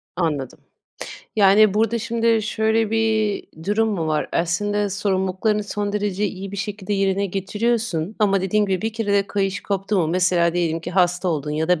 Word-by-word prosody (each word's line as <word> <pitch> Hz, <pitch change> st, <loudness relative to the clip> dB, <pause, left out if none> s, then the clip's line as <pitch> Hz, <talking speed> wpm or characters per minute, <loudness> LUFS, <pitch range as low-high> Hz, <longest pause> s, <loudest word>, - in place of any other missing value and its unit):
Anladım. 150 Hz, -7 st, -2 dB, 0.8 s
Yani, 205 Hz, 0 st, +5 dB
burada 225 Hz, +2 st, +1 dB
şimdi 230 Hz, -1 st, +1 dB
şöyle 220 Hz, 0 st, 0 dB
bir 220 Hz, -2 st, +1 dB, 0.2 s
durum 215 Hz, +3 st, +1 dB
mu 175 Hz, -7 st, -2 dB
var? 155 Hz, -1 st, -1 dB
Aslında 205 Hz, +4 st, 0 dB
sorumluluklarını 195 Hz, +1 st, 0 dB
son 205 Hz, 0 st, -3 dB
derece 205 Hz, -1 st, -1 dB
iyi 195 Hz, 0 st, -6 dB
bir 200 Hz, -, -5 dB
şekilde 205 Hz, 0 st, -4 dB
yerine 195 Hz, 0 st, +1 dB
getiriyorsun 205 Hz, -1 st, -2 dB
ama 195 Hz, -2 st, +3 dB
dediğin 205 Hz, +3 st, +1 dB
gibi 190 Hz, -2 st, -1 dB
bir 220 Hz, 0 st, -2 dB
kere 220 Hz, -3 st, -2 dB
de 200 Hz, -1 st, +2 dB
kayış 195 Hz, -1 st, -2 dB
koptu 200 Hz, +1 st, -1 dB
mu 165 Hz, -, +2 dB
mesela 175 Hz, -1 st, +2 dB
diyelim 165 Hz, -2 st, 0 dB
ki -, -, -6 dB
hasta 180 Hz, 0 st, +1 dB
oldun 150 Hz, -3 st, -2 dB
ya 155 Hz, +2 st, -1 dB
da 180 Hz, -3 st, +3 dB
200 Hz, 175 wpm, -22 LUFS, 180-210 Hz, 0.8 s, Yani